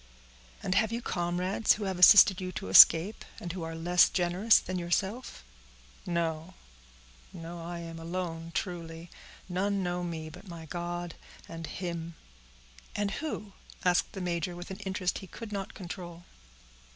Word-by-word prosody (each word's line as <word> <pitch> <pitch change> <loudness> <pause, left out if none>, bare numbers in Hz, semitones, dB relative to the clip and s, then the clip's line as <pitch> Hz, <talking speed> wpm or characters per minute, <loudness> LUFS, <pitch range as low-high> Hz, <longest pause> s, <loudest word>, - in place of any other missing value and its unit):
"And 185 - 0
have 215 +2 +2
you 230 - -2
comrades, 180 0 0
who 210 - -5
have 190 -2 -3
assisted 190 0 +8
you 185 0 -4
to - - -6
escape, 165 - +8 0.2
and 175 -1 -6
who 185 - -6
are 165 0 -5
less 175 +2 +4
generous 185 +5 +3
than 185 0 -3
yourself?" 190 - -2 0.6
"No—no, 160 - -7
I 170 +1 -6
am 165 -1 -8
alone 165 -1 -5
truly—none 180 +3 -4
know 180 0 -2
me 165 -2 -5
but 180 +5 -13
my 170 -2 -9
God 175 0 -5 0.3
and 165 -1 -7
him." 170 -2 -5 0.8
"And 205 -1 -1
who?" 215 -10 -5 0.3
asked 180 +3 +2
the 190 - -6
major, 175 0 -2
with 175 +2 -8
an 190 - -7
interest 190 -2 -2
he 190 - -11
could 225 +4 -9
not 195 -2 -5
control. 175 -2 -8
175 Hz, 145 wpm, -29 LUFS, 165-190 Hz, 0.8 s, assisted